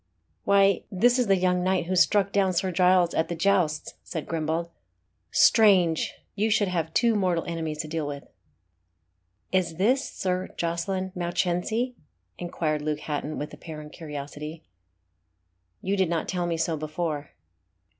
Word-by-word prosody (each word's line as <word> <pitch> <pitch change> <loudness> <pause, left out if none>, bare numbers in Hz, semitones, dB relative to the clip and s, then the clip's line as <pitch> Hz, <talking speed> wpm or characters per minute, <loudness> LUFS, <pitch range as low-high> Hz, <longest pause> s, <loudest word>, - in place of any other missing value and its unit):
"Why, 200 -1 +4
this 240 +6 +3
is 245 - +2
the 195 - +5
young 180 0 +1
knight 185 -1 +1
who 185 +2 -1
struck 200 +2 +3
down 195 -2 +2
Sir 185 +2 0
Giles 180 0 +4
at 160 - +1
the 170 - -3
jousts," 170 -4 +1
said 160 - -5
Grimbald. 165 +1 -2 0.6
"Strange! 185 -7 +4 0.2
you 215 +2 0
should 210 -2 +2
have 165 -3 -1
two 235 -1 +4
mortal 185 -5 +1
enemies 160 -3 -3
to - - -8
deal 155 -1 -3
with." 145 -1 -6 1.3
"Is 180 -3 +1
this 245 - +2
Sir 185 -6 -2
Jocelyn 185 +3 -2
Mounchensey?" 180 +7 -1 0.5
inquired 160 -3 -2
Luke 150 0 -2
Hatton, 150 0 -3
with 150 - -5
apparent 150 -2 -9
curiosity. 150 0 -7 1.2
"You 195 +2 0
did 190 -3 +1
not 170 -1 -1
tell 175 -1 -1
me 170 -1 -1
so 165 0 0
before." 155 -1 -3
175 Hz, 145 wpm, -26 LUFS, 160-190 Hz, 1.3 s, the